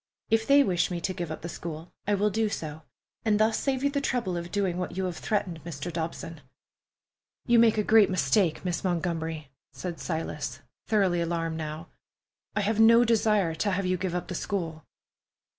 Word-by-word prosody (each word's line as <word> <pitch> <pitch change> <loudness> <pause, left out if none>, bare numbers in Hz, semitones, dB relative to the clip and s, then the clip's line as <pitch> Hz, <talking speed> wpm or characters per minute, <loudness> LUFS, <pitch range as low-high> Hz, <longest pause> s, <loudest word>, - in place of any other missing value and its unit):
"If 225 0 +2
they 280 0 +7
wish 180 -8 +1
me 175 -2 -3
to 185 +2 -2
give 175 -2 -4
up 160 - -6
the - - -3
school, 165 -1 -7
I 205 - +3
will 205 +1 +1
do 220 +1 +1
so, 155 -5 -5 0.4
and 215 -2 +2
thus 220 +1 +3
save 270 -1 -1
you 280 - +2
the 280 0 0
trouble 240 -9 -1
of 170 0 -5
doing 190 -3 0
what 180 0 -4
you 190 - 0
have 180 -3 -3
threatened, 190 -6 -2
Mr. 170 +1 -6
Dobson." 165 -1 -5 1.0
"You 240 -1 +5
make 225 -1 +5
a 210 - +2
great 220 -1 +6
mistake, 185 +1 +1
Miss 175 -2 -1
Montgomery," 165 -4 -2 0.2
said 175 -2 -5
Silas, 160 -2 -4 0.3
thoroughly 190 -6 +2
alarmed 165 -1 -1
now. 155 +1 -5 0.7
"I 210 - +2
have 215 +2 0
no 230 +2 +7
desire 210 -6 +2
to 200 +5 -1
have 195 0 0
you 185 0 +1
give 180 -1 -3
up 180 - -3
the - - -5
school." 165 -4 -3
180 Hz, 190 wpm, -28 LUFS, 165-215 Hz, 1.0 s, they